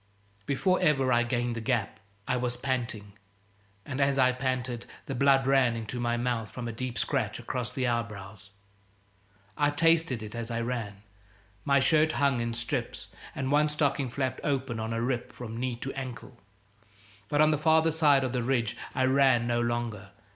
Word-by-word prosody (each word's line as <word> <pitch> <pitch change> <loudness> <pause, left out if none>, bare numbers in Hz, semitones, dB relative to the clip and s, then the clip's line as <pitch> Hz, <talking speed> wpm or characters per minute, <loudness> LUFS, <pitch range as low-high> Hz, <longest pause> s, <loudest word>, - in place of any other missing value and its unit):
Before 185 +7 +1
ever 135 -4 +3
I 120 - +4
gained 120 0 -1
the 115 - -4
gap 115 -3 -1 0.3
I - - +1
was 125 -1 -2
panting, 120 -6 -3 0.7
and 140 0 -3
as 140 0 +2
I 130 -1 +5
panted 125 -2 -3 0.2
the 135 - -4
blood 135 +1 +4
ran 135 -3 +3
into 115 +2 -5
my 120 0 0
mouth 120 -3 -1
from 120 +4 -6
a - - -3
deep 125 +1 -4
scratch - - -1
across 125 -1 -4
the 130 0 -2
eyebrows. 105 -4 -4 1.1
I 145 0 +2
tasted 160 -5 +2
it 105 - -8
as 115 0 -4
I 115 0 -2
ran. 115 -4 -4 0.6
My 140 0 +4
shirt 155 +3 +3
hung 140 -3 +2
in 115 0 -2
strips, 115 0 -4 0.3
and 130 0 -2
one 150 +1 +4
stocking 145 -3 0
flapped 130 +1 -2
open 130 -5 -1
on 110 +1 -3
a 115 0 -1
rip 120 -1 -2
from 115 -2 -8
knee 125 0 -2
to 135 +3 -6
ankle. 130 -1 -7 0.9
But 145 - +1
on 155 0 +6
the 150 - +1
farther 160 +1 +4
side 150 -4 +4
of 130 -1 -2
the 125 - 0
ridge 115 -2 0 0.2
I 130 - +2
ran 130 -2 +4
no 120 0 +1
longer. 120 -4 -2
125 Hz, 180 wpm, -28 LUFS, 120-135 Hz, 1.1 s, on